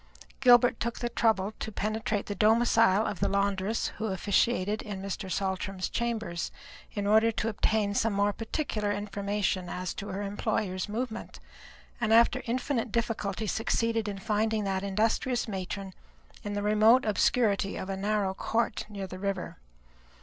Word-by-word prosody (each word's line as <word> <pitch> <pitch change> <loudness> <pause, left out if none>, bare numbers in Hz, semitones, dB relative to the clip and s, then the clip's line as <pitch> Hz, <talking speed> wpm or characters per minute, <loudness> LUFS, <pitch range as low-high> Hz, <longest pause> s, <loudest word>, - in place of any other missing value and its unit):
Gilbert 245 -2 +6
took 235 0 -2
the 240 - -2
trouble 220 -3 +1
to 220 - -4
penetrate 215 0 -2
the 205 - -3
domicile 220 0 +4
of 195 - -3
the - - +2
laundress 200 +2 0
who 220 - -1
officiated 205 +1 +1
in 205 -3 -6
Mr. 195 0 -5
Saltram's 190 -1 -2
chambers, 225 -8 -2 0.4
in 205 -1 -1
order 220 +2 +5
to 225 0 -1
obtain 210 -1 +1
some 225 +2 +1
more 200 0 +1
particular 220 -3 -2
information 200 -2 -2
as 180 -1 -3
to 200 - -6
her 200 +1 -4
employer's 200 -1 -2
movements, 225 +1 -4 0.6
and 220 -1 +1
after 235 +3 +5
infinite 245 -1 -1
difficulty 220 -3 -1
succeeded 225 +1 0
in 200 -1 -3
finding 215 +1 0
that 190 -1 -1
industrious 220 +5 0
matron 195 -1 -5 0.5
in 205 - -4
the 205 0 -2
remote 215 +4 +5
obscurity 210 -2 +2
of 190 - -5
a 195 - -2
narrow 200 0 0
court 225 +4 -1
near 200 -2 -5
the 185 0 -8
river. 195 - -3
210 Hz, 150 wpm, -29 LUFS, 195-225 Hz, 0.6 s, Gilbert